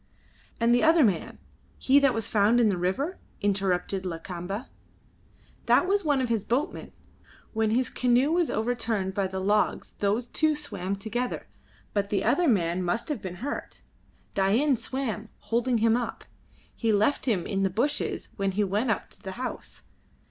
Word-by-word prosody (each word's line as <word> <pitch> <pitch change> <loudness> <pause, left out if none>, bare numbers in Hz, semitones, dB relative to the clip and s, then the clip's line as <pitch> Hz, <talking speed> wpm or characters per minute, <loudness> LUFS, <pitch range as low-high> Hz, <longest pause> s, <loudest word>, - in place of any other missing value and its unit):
"And 230 +1 +4
the 245 - +4
other 320 -1 +5
man, 195 -8 0 0.4
he 270 +2 +5
that 275 -3 +3
was 225 -2 -1
found 215 +3 +3
in 230 -3 +4
the 190 - 0
river?" 265 - -1 0.2
interrupted 195 -2 0
Lakamba. 180 +5 -5 1.0
"That - - +5
was 400 +1 +2
one 290 -4 +2
of 255 - 0
his 225 -4 0
boatmen. 260 +6 -2 0.6
When 220 -1 +1
his 240 +2 +1
canoe 250 +4 +2
was 345 -1 +2
overturned 220 -4 -1
by 195 0 0
the 190 0 -4
logs 205 +2 +1
those 210 +4 +1
two 310 +5 +1
swam 200 -10 -4
together, 235 +5 -3 0.5
but 200 -1 0
the 200 - 0
other 345 +4 +3
man 180 - +2
must 180 - -1
have 295 - -2
been 180 -2 -6
hurt. 285 - -5 0.5
Dain 230 +9 +3
swam, 235 -3 -4
holding 235 +1 0
him 225 0 +3
up. 240 -2 -3 0.5
He 225 -2 +1
left 215 +8 +2
him 200 -8 +1
in 195 -1 -1
the 195 - +2
bushes 250 +10 -1
when 195 -2 0
he 205 +2 +1
went 205 +5 0
up 215 - 0
to - - -20
the 190 - -6
house. 255 +4 -6
220 Hz, 170 wpm, -27 LUFS, 195-255 Hz, 1.0 s, other